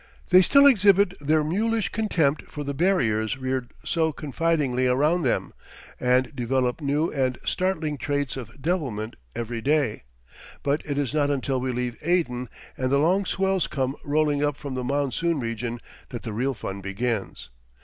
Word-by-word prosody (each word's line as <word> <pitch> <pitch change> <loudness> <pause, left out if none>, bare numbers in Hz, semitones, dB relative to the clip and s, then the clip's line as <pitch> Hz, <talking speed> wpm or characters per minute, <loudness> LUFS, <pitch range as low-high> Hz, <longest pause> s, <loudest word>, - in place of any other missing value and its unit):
They 185 0 +9
still 280 +9 +6
exhibit 200 -6 +5
their 155 +2 +2
mulish 220 +7 0
contempt 165 -10 0
for 150 - -5
the 140 0 -3
barriers 130 - +1
reared 130 -1 -3
so 160 -2 +1
confidingly 145 -4 0
around 150 +8 +2
them, 130 -6 0 0.5
and 125 0 +2
develop 125 +2 0
new 150 +3 0
and 130 -3 0
startling 160 -6 -1
traits 145 -3 -1
of 125 0 -9
devilment 135 - -2 0.2
every 115 0 -4
day; 140 -4 +1 0.6
but 145 +2 0
it 145 -1 -2
is 140 -2 -1
not 145 -2 +2
until 135 -2 -1
we 130 0 -1
leave 125 -1 -3
Aden, 150 -8 0 0.3
and 130 0 -1
the 140 - +4
long 180 +7 +2
swells 190 0 0
come 135 -1 -2
rolling 145 -1 +1
up 145 -1 0
from 140 -2 -6
the 130 -1 -3
monsoon 145 +4 0
region, 115 0 -3 0.3
that 120 -3 -7
the 110 - -5
real 130 +5 -1
fun 100 -2 -6
begins. 100 - -3
140 Hz, 160 wpm, -25 LUFS, 125-160 Hz, 0.6 s, They